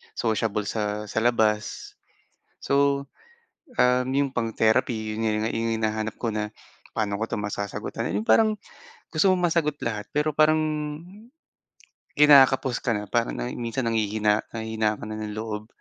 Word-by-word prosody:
sociable 110 -2 0
sa 105 0 -2
sa 110 - -1
labas 110 -2 0 0.7
so, 140 0 +2 0.7
um, 125 - +3
yung 140 -1 +1
pang-therapy 110 -2 0
'yon 115 - 0 0.2
nga - - -1
yung 115 0 -1
hinahanap 110 -1 -1
ko 115 - -1
na 105 0 -2 0.4
paano 100 -2 -1
ko 110 - -1
masasagutan 100 -1 -4
yung 105 - 0
parang 215 -1 +4 0.6
gusto 175 +5 +4
mong 180 -1 +2
masagot 155 -3 +1
lahat 105 -3 -3
pero 150 +1 +2
parang, 155 +1 +4 1.6
kinakapos 135 -3 +6
ka 120 - +1
na 105 - -3
parang 115 +3 0
na - - -3
minsan 120 +2 -3
nanghihina 105 -1 +1
nanghihina 110 -1 -1
ka - - -10
na 110 - -5
ng 105 0 -5
loob. 110 0 -5
115 Hz, 140 wpm, -25 LUFS, 105-130 Hz, 1.6 s, kinakapos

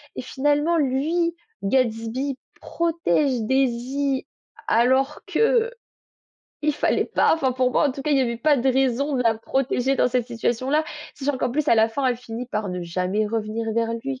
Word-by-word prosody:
et - - -4
finalement 295 +4 +1
lui, 315 +5 0 0.3
Gatsby, 250 +4 0 0.2
protège 300 - 0
Daisy 265 +2 0 0.4
alors 260 +3 +2
qu'il 470 +1 0 0.8
fallait - - +1
pas. - - +3
Enfin 265 -5 0
pour 255 0 +1
moi 295 - +3
en 265 - -2
tout 275 - -7
cas, 300 - -1
il 280 - +4
y - - +3
avait 235 -2 -1
pas 290 +3 +3
de 265 +2 +1
raison 270 +2 +1
de 250 - +1
la 230 -2 +3
protéger 265 +2 0
dans - - +3
cette 245 -1 0
situation-là, 255 +5 0 0.3
sachant 280 -1 -2
qu'en 250 - 0
plus 300 +4 -1
à - - +6
la 220 0 +4
fin 270 +5 -3
elle 250 - +1
finit 235 0 -6
par 210 -4 -3
ne 180 -1 -4
jamais 185 +5 -1
revenir 220 +1 -2
vers 230 0 0
lui 265 +3 -5
260 Hz, 175 wpm, -23 LUFS, 230-285 Hz, 0.8 s, à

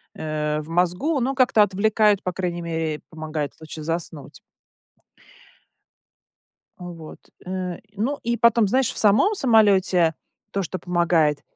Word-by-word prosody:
э, 150 -1 -2
в 155 - -12
мозгу, 180 - 0
но 260 +3 0
как-то 255 -4 +4
отвлекают, 210 +1 +2
по 180 - -3
крайней 175 -2 -3
мере, 160 -2 -3
помогает 155 -2 -5
лучше 155 0 -8
заснуть. 165 -3 -5 2.4
Вот, 170 -3 -10 0.3
э, 180 -1 -4 0.2
ну 260 +8 -2
и 235 0 -1
потом, 235 -1 +4
знаешь, 255 +4 +2
в - - -7
самом 215 - +4
самолете 195 - +3 0.4
то, 195 - -1
что 185 +2 -5
помогает 170 -4 +1
180 Hz, 125 wpm, -23 LUFS, 160-215 Hz, 2.4 s, как-то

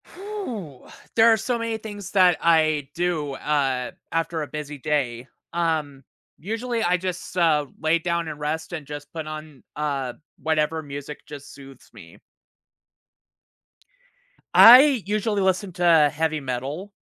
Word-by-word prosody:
Whooh! 250 - -7 0.3
There 230 0 +6
are 225 - +4
so 235 +3 -1
many 230 -1 -2
things 205 -3 -8
that 185 -3 +5
I 155 -4 +2
do, 165 -5 -1
uh, 135 -3 -1 0.2
after 165 0 -1
a 150 - -4
busy 150 -1 -6
day. 130 -4 -2 0.3
Um, 155 -5 -1 0.3
usually 225 +5 -3
I 180 -1 +2
just, 180 0 -5
uh, 155 -4 +3
lay 160 +2 +2
down 170 0 -2
and 150 -1 -7
rest 160 +3 -3
and 155 -4 -5
just 145 0 -8
put 160 -2 -5
on, 155 -3 -9
uh, 140 -4 -2 0.3
whatever 160 0 0
music 145 0 -8
just 145 -1 -10
soothes 135 -2 -14
me. - - -14 2.3
I 255 0 +9
usually 210 0 0
listen 190 +1 0
to 165 -4 +4
heavy 155 0 -1
metal. 140 +9 -5
160 Hz, 135 wpm, -24 LUFS, 145-190 Hz, 2.3 s, I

